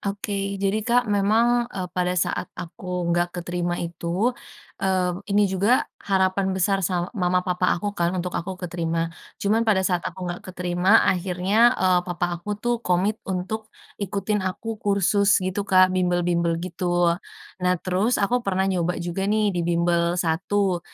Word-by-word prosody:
Oke, 200 Hz, +1 st, -4 dB, 0.2 s
jadi 195 Hz, +2 st, 0 dB
Kak 245 Hz, +3 st, +2 dB
memang, 230 Hz, +4 st, +3 dB
eee, 190 Hz, -6 st, -4 dB
pada 180 Hz, -1 st, 0 dB
saat 165 Hz, -, -1 dB
aku 180 Hz, -1 st, -4 dB
nggak 175 Hz, +1 st, 0 dB
keterima 175 Hz, 0 st, -2 dB
itu, 175 Hz, +7 st, -1 dB, 0.5 s
eee, 185 Hz, -2 st, +1 dB, 0.2 s
ini 205 Hz, +1 st, +3 dB
juga 200 Hz, +6 st, +2 dB, 0.2 s
harapan 190 Hz, 0 st, +1 dB
besar 195 Hz, +1 st, +2 dB
sa 180 Hz, 0 st, -1 dB
mama 180 Hz, -4 st, +1 dB
papa 180 Hz, 0 st, 0 dB
aku 205 Hz, +3 st, -3 dB
kan 170 Hz, -4 st, 0 dB
untuk 180 Hz, 0 st, -3 dB
aku 185 Hz, +2 st, -4 dB
keterima, 165 Hz, -2 st, -2 dB, 0.2 s
cuman 210 Hz, +3 st, +1 dB
pada 190 Hz, -3 st, +3 dB
saat 180 Hz, -2 st, +1 dB
aku 185 Hz, +1 st, -8 dB
nggak 175 Hz, 0 st, -4 dB
keterima 180 Hz, +3 st, +2 dB
akhirnya, 190 Hz, +5 st, +2 dB
eee, 185 Hz, -1 st, +3 dB
papa 175 Hz, 0 st, -1 dB
aku 205 Hz, +3 st, -4 dB
tuh 240 Hz, +2 st, -1 dB
komit 195 Hz, +2 st, 0 dB
untuk 195 Hz, +4 st, -3 dB, 0.3 s
ikutin 200 Hz, +1 st, -1 dB
aku 210 Hz, +4 st, -4 dB
kursus 200 Hz, 0 st, +3 dB
gitu 190 Hz, +2 st, -2 dB
Kak, 185 Hz, 0 st, +5 dB
bimbel-bimbel 175 Hz, -2 st, +1 dB
gitu. 175 Hz, -1 st, +1 dB, 0.5 s
Nah 180 Hz, 0 st, +2 dB
terus 190 Hz, +6 st, +1 dB
aku 240 Hz, +5 st, +1 dB
pernah 190 Hz, -4 st, 0 dB
nyoba 180 Hz, -2 st, 0 dB
juga 175 Hz, +3 st, -3 dB
nih 210 Hz, -1 st, +2 dB
di 175 Hz, -, -1 dB
bimbel 170 Hz, 0 st, +1 dB
1, 180 Hz, +2 st, 0 dB
185 Hz, 155 wpm, -24 LUFS, 175-200 Hz, 0.5 s, Kak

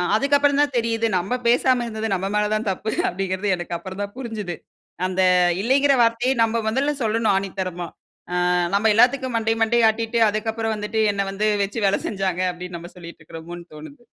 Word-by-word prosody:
அதுக்கப்புறம் 285 Hz, +3 st, +2 dB
தான் 290 Hz, -1 st, +1 dB
தெரியுது 230 Hz, -1 st, 0 dB
நம்ம 195 Hz, +8 st, -1 dB
பேசாம 245 Hz, +1 st, +3 dB
இருந்தது 220 Hz, -1 st, -4 dB
நம்ம 190 Hz, 0 st, -1 dB
மேல 210 Hz, 0 st, +1 dB
தான்தப்பு 215 Hz, -1 st, -2 dB, 0.2 s
அப்பிடிங்கிறது 190 Hz, +2 st, -2 dB
எனக்கு 175 Hz, -1 st, -5 dB
அப்புறம் 190 Hz, +3 st, -8 dB
தான் 200 Hz, 0 st, -7 dB
புரிஞ்சுது 220 Hz, -8 st, -5 dB, 0.5 s
அந்த 185 Hz, 0 st, -1 dB, 0.4 s
இல்லேங்கிற 275 Hz, +5 st, +3 dB
வார்த்தையே 235 Hz, +3 st, +2 dB
நம்ப 225 Hz, +1 st, 0 dB
முதல்ல 270 Hz, +6 st, +1 dB
சொல்லணும் 220 Hz, -1 st, +1 dB
ஆணித்தரமா, 185 Hz, -3 st, -3 dB, 0.5 s
ஆ -, -, 0 dB, 0.4 s
நம்ம 215 Hz, +2 st, +3 dB
எல்லாத்துக்கும் 255 Hz, +2 st, +3 dB
மண்டைய, 225 Hz, 0 st, 0 dB
மண்டைய 230 Hz, 0 st, +3 dB
ஆட்டிட்டு 225 Hz, +1 st, -2 dB
அதுக்கப்பறம் 220 Hz, +1 st, -2 dB
வந்துட்டு 210 Hz, +1 st, -2 dB
என்ன 200 Hz, 0 st, -1 dB
வந்து 205 Hz, +2 st, -1 dB, 0.2 s
வச்சு 200 Hz, +3 st, -4 dB
வேலை 195 Hz, -, +1 dB
செஞ்சாங்க 190 Hz, -3 st, -2 dB
அப்படின்னு 180 Hz, 0 st, -8 dB
நம்ம 175 Hz, +1 st, -11 dB
சொல்லிட்டு 170 Hz, -2 st, -11 dB
இருக்கறோமோன்னு 170 Hz, +2 st, -10 dB
தோணுது. 155 Hz, +7 st, -12 dB
215 Hz, 165 wpm, -22 LUFS, 190-230 Hz, 0.5 s, பேசாம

